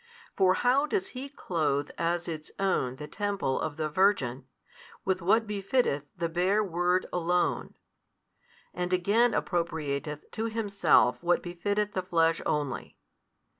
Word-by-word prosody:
For 185 Hz, -1 st, +4 dB
how 265 Hz, +7 st, +3 dB
does 380 Hz, +3 st, -1 dB
He 265 Hz, -1 st, -7 dB
clothe 155 Hz, -, -1 dB
as 170 Hz, +1 st, -1 dB
its 155 Hz, -2 st, -5 dB
own 160 Hz, -10 st, 0 dB
the 150 Hz, +2 st, -8 dB
Temple 200 Hz, -8 st, -1 dB
of 155 Hz, -1 st, -3 dB
the 155 Hz, -1 st, -1 dB
Virgin, 150 Hz, -7 st, +1 dB, 0.6 s
with 190 Hz, 0 st, 0 dB
what 220 Hz, +6 st, +3 dB
befitteth 200 Hz, -, 0 dB
the 170 Hz, 0 st, 0 dB
bare 185 Hz, +6 st, +2 dB
Word 180 Hz, 0 st, +1 dB
Alone: 175 Hz, 0 st, 0 dB, 1.0 s
and 180 Hz, 0 st, -3 dB
again 210 Hz, +7 st, +3 dB
appropriateth 150 Hz, -4 st, -2 dB
to 220 Hz, -, -3 dB
Himself 200 Hz, -, +2 dB
what 175 Hz, 0 st, +2 dB
befitteth 205 Hz, +4 st, -1 dB
the 185 Hz, -, 0 dB
Flesh 165 Hz, -2 st, +2 dB
only? 145 Hz, -4 st, -2 dB
180 Hz, 130 wpm, -29 LUFS, 155-205 Hz, 1.0 s, For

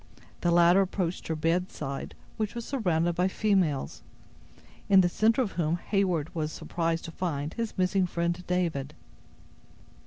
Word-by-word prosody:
The 175 Hz, -, +1 dB
latter 175 Hz, +2 st, +6 dB
approached 185 Hz, -2 st, -2 dB
her 160 Hz, -, -1 dB
bedside, 160 Hz, -3 st, -2 dB, 0.2 s
which 215 Hz, +1 st, -2 dB
was 235 Hz, -1 st, -4 dB
surrounded 175 Hz, -, 0 dB
by 180 Hz, +2 st, +1 dB
females, 190 Hz, -8 st, 0 dB, 0.9 s
in 195 Hz, -1 st, +7 dB
the 180 Hz, -, +3 dB
center 225 Hz, +7 st, +3 dB
of 205 Hz, -, -4 dB
whom 165 Hz, -1 st, 0 dB
Heyward 180 Hz, -5 st, 0 dB
was 155 Hz, -2 st, -2 dB
surprised 165 Hz, +1 st, -2 dB
to 165 Hz, -, -6 dB
find 155 Hz, -4 st, -3 dB
his 230 Hz, -2 st, -4 dB
missing 185 Hz, 0 st, +2 dB
friend 170 Hz, +1 st, -2 dB
David. 165 Hz, -6 st, -1 dB
175 Hz, 145 wpm, -28 LUFS, 165-190 Hz, 0.9 s, in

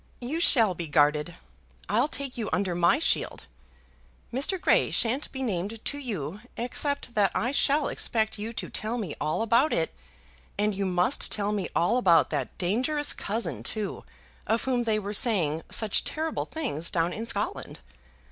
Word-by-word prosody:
"You 265 Hz, +7 st, -3 dB
shall 230 Hz, -, +5 dB
be 170 Hz, -1 st, -5 dB
guarded. 150 Hz, +2 st, +2 dB, 0.5 s
I'll 235 Hz, +7 st, +2 dB
take 280 Hz, -4 st, -5 dB
you 225 Hz, -4 st, -3 dB
under 190 Hz, -2 st, 0 dB
my 170 Hz, 0 st, +3 dB
shield. -, -, 0 dB, 0.9 s
Mr. 285 Hz, +9 st, +1 dB
Grey -, -, +3 dB
shan't 250 Hz, +5 st, +1 dB
be 265 Hz, 0 st, -4 dB
named 210 Hz, 0 st, -3 dB
to 285 Hz, -, -2 dB
you, 200 Hz, -, -4 dB, 0.2 s
except 250 Hz, +2 st, +1 dB
that 205 Hz, -3 st, +3 dB
I 245 Hz, -, 0 dB
shall 285 Hz, +1 st, +2 dB
expect 220 Hz, -2 st, -1 dB
you 220 Hz, +2 st, -4 dB
to 230 Hz, -, -5 dB
tell 220 Hz, +3 st, -2 dB
me 195 Hz, -10 st, -4 dB
all 155 Hz, +9 st, 0 dB
about 235 Hz, +7 st, +3 dB
it; -, -, 0 dB, 0.6 s
and 210 Hz, +1 st, +1 dB
you 195 Hz, 0 st, -1 dB
must 180 Hz, +8 st, +1 dB
tell 205 Hz, -1 st, -1 dB
me 205 Hz, -2 st, -2 dB
all 175 Hz, +9 st, +3 dB
about 170 Hz, -, +4 dB
that 140 Hz, -4 st, -3 dB
dangerous 255 Hz, -, +1 dB
cousin, 220 Hz, +3 st, -3 dB
too, 215 Hz, -2 st, -3 dB, 0.4 s
of 225 Hz, +1 st, +1 dB
whom 250 Hz, -2 st, 0 dB
they 220 Hz, -2 st, +1 dB
were 205 Hz, 0 st, -4 dB
saying 180 Hz, -, +1 dB
such 220 Hz, -3 st, +2 dB
terrible 315 Hz, 0 st, -3 dB
things 235 Hz, -, -3 dB
down 170 Hz, +1 st, 0 dB
in 225 Hz, +2 st, -5 dB
Scotland. 270 Hz, -, -3 dB
220 Hz, 165 wpm, -27 LUFS, 180-250 Hz, 0.9 s, shall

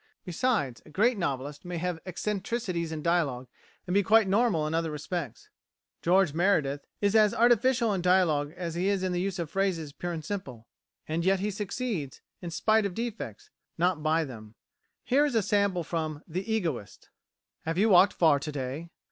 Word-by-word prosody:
Besides, 175 Hz, -, -1 dB
a -, -, -16 dB
great 225 Hz, +10 st, +2 dB
novelist 145 Hz, -5 st, -3 dB
may 175 Hz, -1 st, -5 dB
have 175 Hz, 0 st, -2 dB
eccentricities 185 Hz, -2 st, -2 dB
in 155 Hz, -1 st, -5 dB
dialogue, 145 Hz, -8 st, 0 dB, 0.4 s
and 180 Hz, -, -3 dB
be 200 Hz, -, +5 dB
quite 220 Hz, +1 st, +4 dB
normal 195 Hz, -5 st, +2 dB
in 155 Hz, -, -2 dB
other 165 Hz, 0 st, 0 dB
respects. 150 Hz, -2 st, -5 dB, 0.5 s
George 180 Hz, -2 st, +3 dB
Meredith 155 Hz, -6 st, +1 dB
is 205 Hz, +1 st, +2 dB
as 215 Hz, -2 st, +5 dB
artificial 240 Hz, -1 st, +3 dB
in 190 Hz, -, -1 dB
dialogue 170 Hz, -5 st, +2 dB
as 170 Hz, -2 st, -4 dB
he 175 Hz, +3 st, -1 dB
is 200 Hz, -2 st, +1 dB
in 185 Hz, -, 0 dB
the 175 Hz, 0 st, -1 dB
use 195 Hz, 0 st, -2 dB
of 170 Hz, -4 st, -4 dB
phrases 180 Hz, -7 st, -1 dB
pure 175 Hz, +3 st, -4 dB
and 160 Hz, -3 st, -5 dB
simple, 135 Hz, -, -6 dB, 0.4 s
and 160 Hz, +2 st, -1 dB
yet 190 Hz, +1 st, +3 dB
he 210 Hz, +2 st, -1 dB
succeeds, 200 Hz, -, -4 dB, 0.2 s
in 175 Hz, -, -5 dB
spite 215 Hz, +5 st, +2 dB
of 180 Hz, -, -9 dB
defects, 225 Hz, -, -5 dB, 0.3 s
not 175 Hz, -1 st, +1 dB
by 160 Hz, +1 st, +2 dB
them. 110 Hz, -6 st, -10 dB, 0.5 s
Here 275 Hz, +4 st, +3 dB
is 290 Hz, -5 st, 0 dB
a 225 Hz, -, +3 dB
sample 200 Hz, -3 st, +1 dB
from 155 Hz, -2 st, -3 dB
"The 185 Hz, +6 st, -4 dB
Egoist": 160 Hz, -, -3 dB, 0.6 s
"Have 165 Hz, +1 st, -2 dB
you 215 Hz, +4 st, +4 dB
walked 190 Hz, +1 st, +6 dB
far 155 Hz, -4 st, +4 dB
to 150 Hz, +2 st, -5 dB
day?" 140 Hz, +4 st, -5 dB
175 Hz, 180 wpm, -28 LUFS, 155-200 Hz, 0.6 s, walked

